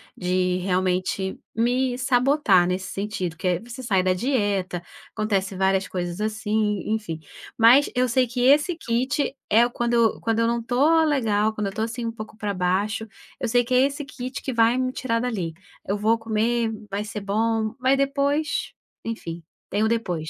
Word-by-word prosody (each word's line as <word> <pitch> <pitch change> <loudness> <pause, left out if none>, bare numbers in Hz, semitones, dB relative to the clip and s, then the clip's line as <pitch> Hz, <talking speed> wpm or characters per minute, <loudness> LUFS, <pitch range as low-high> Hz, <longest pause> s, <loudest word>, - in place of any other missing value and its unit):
de 180 0 0
realmente 185 +1 -1 0.2
me 245 +2 +1
sabotar 250 -7 +3
nesse 185 +1 -2
sentido, 195 -4 -3
que 180 - -9
é 180 -1 +2
você 245 +3 -9
sai 195 -5 +2
da 185 0 +2
dieta, 200 -6 -1 0.3
acontecem 195 -3 -1
várias 190 0 +2
coisas 175 +1 -4
assim, 215 -1 0
e 210 - -6
enfim. 210 -8 -2 0.4
Mas 240 +5 +6
eu 250 0 +2
sei 255 +2 +2
que 245 +1 -5
esse 295 +6 +4
kit 265 +3 -1
é 230 +3 +5
o - - -2
quando 235 -1 +2
quando 225 0 0
eu 230 - +3
não 235 0 0
estou 290 +7 +3
legal, 220 -8 +2
quando 210 -2 -2
eu - - -3
estou 220 +3 -2
assim 230 +1 -4
um 230 - -2
pouco 215 -1 -9
pra 205 -2 -2
baixo, 195 +5 0 0.3
eu 245 -4 -3
sei 245 0 +3
que 255 - -3
é 250 - +5
esse 285 +1 -3
kit 255 -1 -6
que 260 - -3
vai 230 +2 +3
me 255 0 -1
tirar 230 -3 -1
dali. 210 -9 -2 0.3
Eu 200 +2 -1
vou 220 +2 +2
comer, 225 +1 0 0.2
vai 200 +1 -2
ser 215 0 -5
bom, 220 +2 0
mas 265 +1 +3
depois, 280 +2 0 0.3
enfim, 170 -7 -5 0.3
tem 210 +2 0
o 220 - +2
depois. 175 -9 -2
225 Hz, 185 wpm, -24 LUFS, 195-250 Hz, 0.4 s, Mas